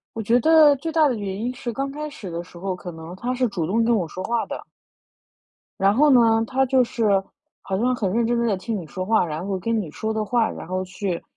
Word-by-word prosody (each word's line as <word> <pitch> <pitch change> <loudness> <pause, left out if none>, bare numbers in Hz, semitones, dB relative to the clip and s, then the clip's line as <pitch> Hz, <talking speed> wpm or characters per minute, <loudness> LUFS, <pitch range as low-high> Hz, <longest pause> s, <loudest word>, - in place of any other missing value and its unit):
我 225 - -3
觉 235 +4 +3
得 310 +1 +6
最 325 +4 -4
大 315 -2 +4
的 255 - 0
原 200 -3 -4
因 250 +2 -2
是， 240 - -4
刚 275 +4 -3
开 300 +1 -5
始 255 -11 -9
的 170 +1 -4
时 175 0 -15
候 190 +1 -3
可 180 0 -8
能 160 +2 -9
他 245 +6 -3
是 255 0 +1
主 175 -6 -2
动 225 +6 +1
跟 235 0 +3
我 180 -6 -1
说 185 +4 -7
话 235 +2 0
的。 - - -5 1.2
然 195 +2 +3
后 295 +4 +5
呢， 230 -4 +5
他 265 +3 +1
就 260 0 +3
是 210 -5 +1 0.4
好 190 - -3
像 250 +4 +1
很 200 -6 -1
认 230 +3 +1
真 240 0 +1
地 235 - +1
在 210 -4 +1
听 220 +4 -3
你 180 - -6
说 185 +4 -5
话， 220 -2 +3
然 160 +3 -5
后 195 -1 -1
跟 225 +5 -1
你 175 - -7
说 220 +6 -3
的 215 -1 -1
话， 230 +1 +1
然 - - -8
后 185 +1 -2
去 185 -1 -4
225 Hz, 280 characters per minute, -23 LUFS, 185-245 Hz, 1.2 s, 得